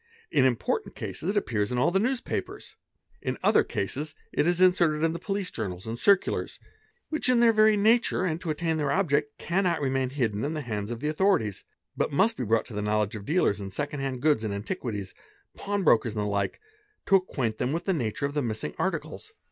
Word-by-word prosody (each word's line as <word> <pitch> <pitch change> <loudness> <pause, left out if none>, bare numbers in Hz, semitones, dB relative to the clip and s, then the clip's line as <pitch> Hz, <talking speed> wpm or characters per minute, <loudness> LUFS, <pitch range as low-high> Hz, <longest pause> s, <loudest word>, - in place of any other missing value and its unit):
In 140 -4 +4
important 125 -3 0
cases 170 - -4
it 205 - 0
appears 110 - 0
in 125 - -1
all 125 - +3
the 190 - +2
newspapers, 250 +4 -3 0.5
in - - -2
other - - +5
cases 145 +9 -4 0.2
it 150 - +2
is 175 0 +2
'inserted 170 -4 +4
in 165 0 +2
the 170 - -5
police 195 -2 -3
journals 95 -5 -5
and 115 +1 -5
circulars, 200 +5 +2 0.5
which 310 -4 0
in 250 -1 +4
their 235 -1 +5
very 215 -1 +5
nature 225 -1 +3
Pe 170 - +1
nd 165 - -6
to 170 - -4
attain 160 +1 0
their 145 -2 0
object 145 -5 +1
cannot 175 -1 0
remain 135 -2 0
hidden 115 -6 -1
in 155 +3 -2
the 155 - -2
hands 105 -5 -4
of 120 0 -5
the 150 - -1
_ - - +1
authorities, 155 - +1 0.3
but - - 0
must 200 +11 +3
be - - -3
brought 115 0 +1
to - - -11
the 105 - -2
knowledge 105 0 0
of 100 -2 -7
dealers 150 - +2
in 100 -1 -5
second 145 +8 -4
hand 135 -2 -3
goods 150 -8 +3
and 105 -2 -2
antiquities, 105 - -4 0.4
pawn 200 -1 -2
brokers, 115 -7 +3
and 105 - -1
the - - -2
like, 100 -1 -1 0.5
to - - -1
acquaint 130 - -3
them 125 - 0
with 165 +3 -2
the 190 - +2
nature 125 -4 -2
of 140 - -3
the 145 - 0
missing 110 - -3
articles. - - -3
145 Hz, 220 wpm, -27 LUFS, 110-185 Hz, 0.5 s, other